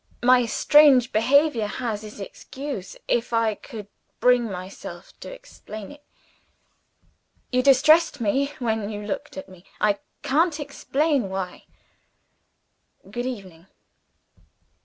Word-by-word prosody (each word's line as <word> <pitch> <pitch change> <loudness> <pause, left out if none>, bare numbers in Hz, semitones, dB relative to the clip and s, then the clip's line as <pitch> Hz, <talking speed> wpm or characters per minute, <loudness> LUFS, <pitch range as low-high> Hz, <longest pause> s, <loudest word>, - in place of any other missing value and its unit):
My 250 -1 +5
strange 270 0 +5
behavior 255 0 +3
has 220 -1 -4
its 210 -1 -10
excuse 260 +2 -7
if 235 0 0
I 230 -1 +2
could 215 -1 -10 0.3
bring 250 0 +4
myself 190 -2 -8
to - - -9
explain 360 - -10
it. 290 0 -15 1.5
You 255 0 +3
distressed 290 +4 +5
me, 255 +6 +1
when 220 -4 -2
you 210 -1 -6
looked 205 - -5
at 190 - -7
me. 185 -2 -16 0.2
I 205 -1 +2 0.2
can't 315 +3 +2
explain 285 -3 -1
why. 190 -1 -5 1.5
Good 245 +1 -3
evening." 190 -8 -8
240 Hz, 115 wpm, -24 LUFS, 205-280 Hz, 1.5 s, My